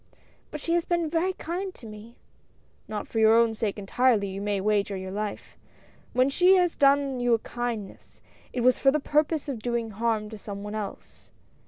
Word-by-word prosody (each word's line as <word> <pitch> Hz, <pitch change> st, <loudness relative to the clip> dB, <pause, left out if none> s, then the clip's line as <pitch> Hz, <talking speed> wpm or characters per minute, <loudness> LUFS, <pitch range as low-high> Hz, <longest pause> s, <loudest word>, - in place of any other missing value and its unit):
"But 300 Hz, -, -6 dB
she 335 Hz, +3 st, -2 dB
has 345 Hz, -1 st, +2 dB
been 340 Hz, -3 st, -1 dB
very 350 Hz, +3 st, +1 dB
kind 365 Hz, +3 st, -5 dB
to -, -, -13 dB
me." 215 Hz, +2 st, -11 dB, 0.7 s
"Not 210 Hz, -1 st, -5 dB
for 225 Hz, -, -2 dB
your 220 Hz, +1 st, +6 dB
own 230 Hz, -1 st, +4 dB
sake 215 Hz, -2 st, -2 dB
entirely, 210 Hz, 0 st, +2 dB
you 195 Hz, +1 st, -5 dB
may 205 Hz, -1 st, -1 dB
wager 205 Hz, 0 st, 0 dB
your 185 Hz, 0 st, -6 dB
life. 210 Hz, +1 st, -5 dB, 0.5 s
When 255 Hz, +1 st, +3 dB
she 360 Hz, +7 st, +5 dB
has 360 Hz, -2 st, +2 dB
done 275 Hz, -2 st, +3 dB
you 245 Hz, -1 st, +3 dB
a -, -, 0 dB
kindness, 230 Hz, -3 st, -6 dB, 0.3 s
it 250 Hz, -, -2 dB
was 250 Hz, +1 st, +4 dB
for 270 Hz, -, +5 dB
the 305 Hz, +3 st, +2 dB
purpose 300 Hz, +1 st, 0 dB
of 265 Hz, -5 st, -4 dB
doing 235 Hz, 0 st, -2 dB
harm 220 Hz, 0 st, -1 dB
to 220 Hz, -, -8 dB
some 200 Hz, -1 st, -7 dB
one 205 Hz, 0 st, -6 dB
else." 210 Hz, -2 st, -7 dB
235 Hz, 195 wpm, -26 LUFS, 210-285 Hz, 0.7 s, your